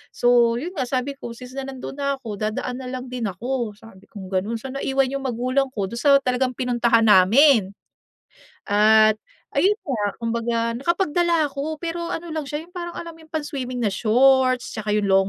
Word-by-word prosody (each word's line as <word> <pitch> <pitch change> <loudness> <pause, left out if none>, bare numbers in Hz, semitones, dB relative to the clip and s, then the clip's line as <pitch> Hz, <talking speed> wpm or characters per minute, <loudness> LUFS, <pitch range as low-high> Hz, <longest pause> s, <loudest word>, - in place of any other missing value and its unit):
So 240 -1 +4
'yun 315 +10 -4
nga 255 - -1
sabi 260 +2 -1
ko, 235 -1 -7
since 250 +1 -11
na 270 - -5
nandun 270 +1 -8
na 280 0 0
ako, 225 -7 -8
dadaan 215 +4 -3
na 260 - -7
lang 255 0 -6
din 245 -4 -2
ako, 235 +3 -3
sabi 210 -3 -17
kong 190 -2 -10
gano'n. 195 +5 -1
So 260 +3 -7
naiwan 270 -1 0
'yung 275 0 -4
magulang 255 +3 0
ko, 195 -2 -1
dun 235 - -5
sa 280 +1 +5
talagang 255 0 0
pinuntahan 240 -2 +2
namin. 210 +2 +6 1.0
At 215 +1 +5 0.4
ayun 415 +3 +3
nga, 245 -8 -2 0.2
kumbaga 230 0 -1
nakapagdala 340 +2 +1
ako 290 +2 -5
pero 340 0 -4
ano 335 -2 -5
lang 305 -3 -4
siya 300 +2 -4
'yung 355 - -26
parang 345 -1 -6
alam 335 -1 -7
mo 325 - -18
'yung 315 - -20
pang-swimming 280 -5 -4
na 210 -5 0
shorts, 255 +3 +3
'tsaka 215 -1 -4
'yung 210 -1 +1
long 195 0 +3
250 Hz, 190 wpm, -22 LUFS, 225-280 Hz, 1.0 s, namin